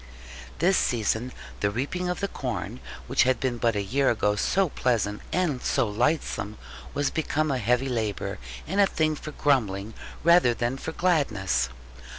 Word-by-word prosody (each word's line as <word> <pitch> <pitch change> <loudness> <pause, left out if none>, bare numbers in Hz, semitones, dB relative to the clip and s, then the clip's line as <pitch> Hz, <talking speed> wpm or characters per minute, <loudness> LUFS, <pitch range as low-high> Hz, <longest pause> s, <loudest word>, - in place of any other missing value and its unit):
This 180 +3 +3
season, 120 +1 0 0.3
the 100 - +1
reaping 145 - -2
of 180 - -2
the 200 - +1
corn, 125 - -4 0.3
which - - +2
had 130 -2 +3
been 125 -3 -1
but 115 -2 +2
a 100 - 0
year 135 +7 +2
ago 105 -2 +2
so 185 - +2
pleasant 110 -7 0
and 160 -8 0
so 130 -4 +1
lightsome, 110 -1 -1 0.4
was 145 0 +1
become 155 -1 0
a 130 - 0
heavy 125 +4 +1
labour, 110 -6 -2 0.3
and 195 +5 +1
a 200 - +6
thing 155 -3 +1
for 155 - -7
grumbling 110 -9 +1 0.3
rather 170 -8 +5
than 120 +2 -1
for 160 - -4
gladness. 110 - +1
125 Hz, 160 wpm, -26 LUFS, 110-155 Hz, 0.4 s, a